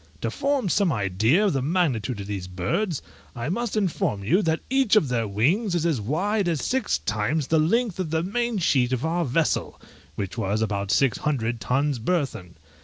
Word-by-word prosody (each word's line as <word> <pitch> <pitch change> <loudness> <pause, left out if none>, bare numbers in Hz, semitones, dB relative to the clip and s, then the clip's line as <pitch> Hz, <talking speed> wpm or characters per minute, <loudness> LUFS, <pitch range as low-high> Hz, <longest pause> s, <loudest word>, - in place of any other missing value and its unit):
To - - -1
form 280 -5 0
some 190 0 +2
idea 110 - +2
of 200 - +2
the 135 - 0
magnitude 130 - 0
of - - -6
these 100 -3 -5
birds, 150 - -2 0.3
I 120 +3 -3
must 230 +3 -2
inform 160 - 0
you 170 - +3
that 160 -4 0
each 265 -5 +3
of 160 -11 +3
their 115 -3 0
wings 170 - +1
is 170 -1 0
as 155 -9 +1
wide 185 - 0
and 165 -4 0
six 255 - 0
times 110 - -1
the 160 +3 +2
length 205 +5 +1
of 180 -4 -2
the 160 +1 0
main 235 +4 -1
sheet 130 -8 +2
of 130 +3 -1
our 170 +2 0
vessel, 155 +3 0 0.4
which 100 +3 -4
was 105 +1 0
about 100 -2 -2
six 130 +4 +2
hundred 120 -6 -1
tons 140 +1 0
burthen. 115 - -2
150 Hz, 190 wpm, -25 LUFS, 110-185 Hz, 0.4 s, you